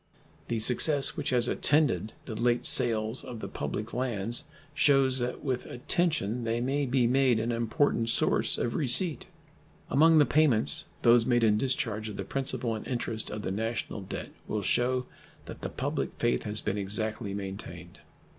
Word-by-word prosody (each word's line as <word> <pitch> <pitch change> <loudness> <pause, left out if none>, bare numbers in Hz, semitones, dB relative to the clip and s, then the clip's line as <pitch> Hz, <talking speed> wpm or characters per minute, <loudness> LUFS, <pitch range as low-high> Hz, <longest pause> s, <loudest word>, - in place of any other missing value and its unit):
The 115 - -2
success 135 +6 +4
which 150 -5 -3
has 125 -2 +2
attended 130 - 0
the 115 - -7
late 120 +2 0
sales 115 -1 +5
of 120 -3 -8
the - - -6
public 110 +2 -5
lands 120 +2 0 0.3
shews 135 -2 +3
that 125 +2 -4
with 130 -3 -3
attention 125 - -1
they 115 +1 -1
may 135 +3 -1
be 125 -1 +1
made 125 -1 +2
an 115 +2 -2
important 115 0 0
source - - +1
of 115 - -2
receipt. 150 +4 +1 0.6
Among 160 +4 +5
the 150 - +5
payments 135 - +3 0.2
those 115 -1 +5
made 120 -2 +2
in 105 -2 +3
discharge 110 -3 -2
of 100 - -8
the 100 - -4
principal 125 0 -3
and 110 - -7
interest 115 -3 -3
of 105 0 -6
the - - -3
national 110 +1 -4
debt 95 - -7 0.2
will 105 -1 -3
shew 125 +4 0 0.4
that - - -10
the - - -4
public - - -3
faith - - -1
has 105 0 0
been 100 +1 -3
exactly 105 +1 -1
maintained. 100 -1 -8
120 Hz, 165 wpm, -28 LUFS, 110-130 Hz, 0.6 s, sales